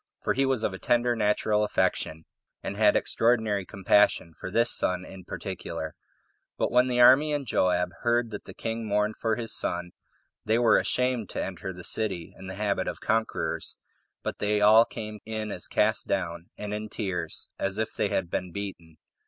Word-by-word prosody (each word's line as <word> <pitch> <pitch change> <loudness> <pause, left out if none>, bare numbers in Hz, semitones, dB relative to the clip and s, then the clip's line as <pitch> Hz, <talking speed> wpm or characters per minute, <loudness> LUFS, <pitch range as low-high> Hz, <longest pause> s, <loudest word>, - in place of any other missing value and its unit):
for - - +1
he 135 +1 +1
was 130 -4 0
of - - 0
a 95 - -7
tender 120 0 +2
natural 105 0 +2
affection, 80 -5 0 0.4
and 100 - -4
had 105 0 +4
extraordinary 110 -4 +2
compassion 100 -3 +3
for - - -5
this 115 +4 +3
son 90 0 0
in 95 0 -11
particular. 85 -4 -5 0.6
But - - 0
when 125 +1 +4
the 125 -1 0
army 135 +5 +7
and 145 -2 -1
Joab 90 -5 +1
heard 120 -1 +1
that 105 - -7
the - - -10
king 115 -1 -4
mourned 105 +1 0
for 110 -1 0
his 115 -1 -3
son, 90 0 -1 0.5
they 110 - +2
were 115 -2 +5
ashamed 125 -5 0
to - - -3
enter 95 0 -5
the 90 -1 -10
city 95 -6 -1
in 95 - -10
the 95 - -6
habit 100 -3 -1
of - - -4
conquerors, 110 0 -1 0.5
but - - -4
they 105 0 +1
all 110 +2 +7
came 110 -2 -7
in 110 -1 -4
as 90 - -5
cast 110 +1 +1
down, 85 -3 -2
and 105 0 -5
in 105 +1 -4
tears, 95 -6 -3
as 95 +1 -1
if 110 0 -2
they 105 - 0
had 85 -3 -2
been 90 -1 -2
beaten. 85 -5 -7
105 Hz, 185 wpm, -27 LUFS, 95-115 Hz, 0.6 s, army